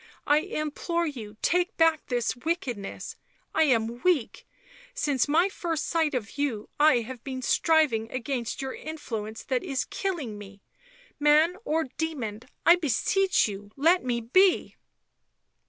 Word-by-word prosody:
" - - -30
I 295 +1 +4
implore 335 +1 -2
you 225 -9 -6
take 355 0 +1
back 325 -2 +3
this 245 -1 -1
wickedness, 245 - -4 0.4
I 320 - +4
am 235 -3 +1
weak; 345 -10 0 0.5
since 290 - +1
my 325 +6 +4
first 335 -5 -3
sight 320 -4 +1
of 235 +2 -4
you 240 -8 -2
I 295 -5 +5
have 240 +1 -8
been 260 -2 -5
striving 285 -8 +2
against 255 -1 -3
your 265 - -4
influence 225 -9 -6
that 255 -2 -1
is 270 -2 -2
killing 300 - -4
me; 200 -1 -12 0.6
man 305 +4 +4
or 320 -4 +1 0.2
demon, 250 -10 -3 0.2
I 340 +2 +7
beseech 355 - +2
you, 205 0 -7
let 335 +6 +3
me 245 -2 -1
be 370 +11 +3
285 Hz, 140 wpm, -27 LUFS, 235-325 Hz, 0.6 s, I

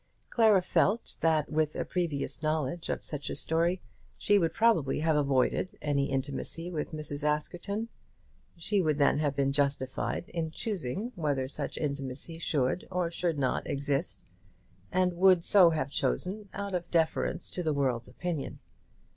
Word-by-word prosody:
Clara 215 -5 +5
felt 210 +4 +1
that 160 -2 +2
with 155 -1 +1
a - - -2
previous 170 -6 -2
knowledge 155 +1 -1
of - - -2
such 145 -2 -4
a - - -3
story 170 +3 +1 0.3
she 205 0 +3
would 165 -3 +1
probably 205 -13 +2
have 160 -1 +2
avoided 140 +5 +1
any 140 -1 0
intimacy 140 +5 -2
with 155 -3 -3
Mrs. 150 -2 -4
Askerton. 175 +8 -1 0.7
She 195 +4 +1
would 155 -4 +1
then 145 0 +3
have 145 -2 0
been 135 0 +1
justified 140 +2 -1
in 165 -2 -2
choosing 200 - -3
whether 145 -6 -1
such 145 +1 -4
intimacy 140 +2 -4
should 145 0 0
or 180 -2 -1
should 170 -2 -1
not 130 -2 0
exist, 140 0 -2 0.7
and 185 -1 +2
would 180 -1 +5
so 190 -3 +7
have 155 -4 -1
chosen 200 +6 -1
out 200 -1 -5
of 175 -1 -2
deference 165 -2 0
to 180 - -3
the 160 -3 0
world's 130 -4 0
opinion. 170 -6 -4
160 Hz, 155 wpm, -30 LUFS, 140-180 Hz, 0.7 s, so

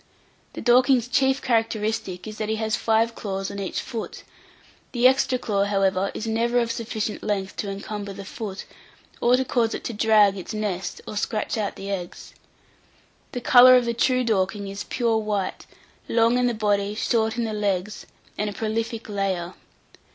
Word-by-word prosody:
The - - -6
Dorking's 250 0 +4
chief 265 +1 +2
characteristic 220 -5 -1
is 215 0 -8
that 215 -1 -2
he 220 - +1
has 220 0 -1
five 225 +1 +1
claws 195 -3 -4
on 200 - -6
each 195 - -3
foot; 230 -4 -6 0.7
the 245 0 +5
extra 260 -1 +2
claw, 200 -5 0
however, 195 -1 +1
is 220 - -4
never 230 +2 0
of 235 -1 +1
sufficient 225 -2 -3
length 195 -2 -2
to 205 - -3
encumber 200 +1 -5
the 195 0 -8
foot, 205 -1 -6 0.6
or 245 +1 +4
to 260 - 0
cause 235 -3 +1
it - - -7
to 235 - -4
"drag" 210 -2 +4
its 185 - -7
nest, 195 -4 -3
or - - -6
scratch 215 +2 -2
out 215 -3 -2
the 195 +1 -6
eggs. 180 -3 -6 1.0
The 245 - -3
colour 255 +1 +8
of 250 -1 +4
the 235 - 0
true 255 +2 +2
Dorking 200 -2 0
is 200 +1 -6
pure 230 -3 0
white; 205 -3 -3 0.4
long 230 +1 +3
in 250 - +2
the 240 - -1
body, 205 -1 0
short 225 0 0
in 235 - 0
the 220 -1 -2
legs, 205 -1 -2 0.3
and 210 0 0
a - - -6
prolific 225 +2 -3
layer. 190 -4 -2
215 Hz, 180 wpm, -24 LUFS, 200-235 Hz, 1.0 s, colour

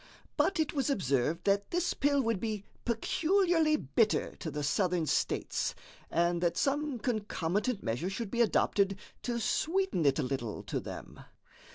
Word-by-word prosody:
But 375 -4 +2
it 315 - +1
was 280 -1 0
observed 155 - +1
that 200 0 +2
this 350 0 0
pill 285 -1 +2
would 230 -4 0
be 215 -2 -3 0.2
peculiarly 325 - +2
bitter 225 -7 +1
to 165 - -5
the 150 0 -4
Southern 180 +2 +1
States, - - 0 0.3
and 170 0 +1
that 170 0 +1
some 285 -1 0
concomitant 210 -1 -1
measure 125 +11 -1
should 195 +1 -4
be 240 - +1
adopted 200 -3 +2 0.2
to 240 -1 -2
sweeten 330 - +1
it 135 - +3
a - - +1
little 125 -4 -3
to - - -2
them. - - -8
210 Hz, 155 wpm, -31 LUFS, 170-280 Hz, 0.3 s, it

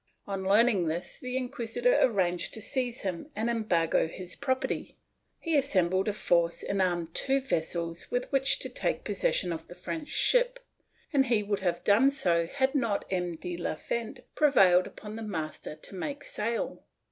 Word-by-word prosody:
On 195 -1 -3
learning 200 -2 +4
this, 165 +3 -3
the 255 0 -3
inquisitor 255 - 0
arranged 180 -7 +1
to - - -6
seize 250 +1 -2
him 190 - -4
and 225 +2 0
embargo 175 -9 +1
his 180 +2 -7
property; 260 -2 -2 0.4
he 330 -2 -1
assembled 190 -9 +2
a 210 - +1
force 170 -4 +2
and 195 -1 0
armed 175 -3 0
two 275 0 +1
vessels 170 -8 -2
with 245 0 0
which 270 -1 +3
to - - -2
take - - -1
possession 185 - 0
of 160 0 -7
the 175 - -11
French 315 - -5
ship, - - +2 0.5
and 270 -2 +4
he 225 -3 +2
would 205 -1 -1
have 175 -2 -1
done 225 +7 +5
so 170 -11 +1
had 265 +6 0
not 230 -8 0
M, 180 -2 -1
de 175 +2 -5
la 170 - -2
Fent 230 +7 -4
prevailed 190 -12 +5
upon 215 +1 -9
the - - -6
master 160 -7 -5
to 155 - -9
make 280 +10 -4
sail. 230 +2 -2
205 Hz, 170 wpm, -29 LUFS, 175-260 Hz, 0.5 s, done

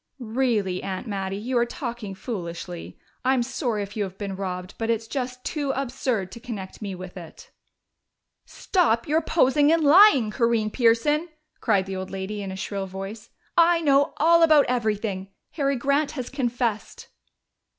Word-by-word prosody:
"Really, 225 -6 0
Aunt 190 +1 -4
Mattie, 195 -3 -3
you 245 +5 -3
are 235 - +3
talking 235 -6 -6
foolishly. 175 -5 -6 0.3
I'm 260 -1 +2
sorry 240 -4 -2
if 200 +1 -9
you 210 - 0
have 190 -1 -7
been 200 -2 -4
robbed, 185 0 -5
but 225 0 -2
it's 225 -1 0
just 250 -1 -4
too 290 -3 -2
absurd 250 -7 -2
to 235 - -9
connect 215 -6 -7
me 200 -3 -4
with 185 0 -9
it." 170 -3 -11 1.0
"Stop 275 - +1
your 310 +2 +2
posing 295 -2 +3
and 330 -1 +3
lying, 290 - +7
Corinne 230 -2 +1
Pearson!" 275 +8 +2 0.3
cried 200 -5 +2
the 190 0 -5
old 185 0 -5
lady 195 +2 -4
in 195 -1 -5
a - - -5
shrill 195 0 -4
voice. 195 +4 -7 0.3
"I 340 0 +5
know 285 0 +3
all 335 +2 +5
about 310 -3 +6
everything. 215 -5 -1 0.2
Harry 280 -3 0
Grant 280 +4 +1
has 255 -4 -5
confessed." 245 -5 -2
230 Hz, 160 wpm, -25 LUFS, 195-275 Hz, 1.0 s, lying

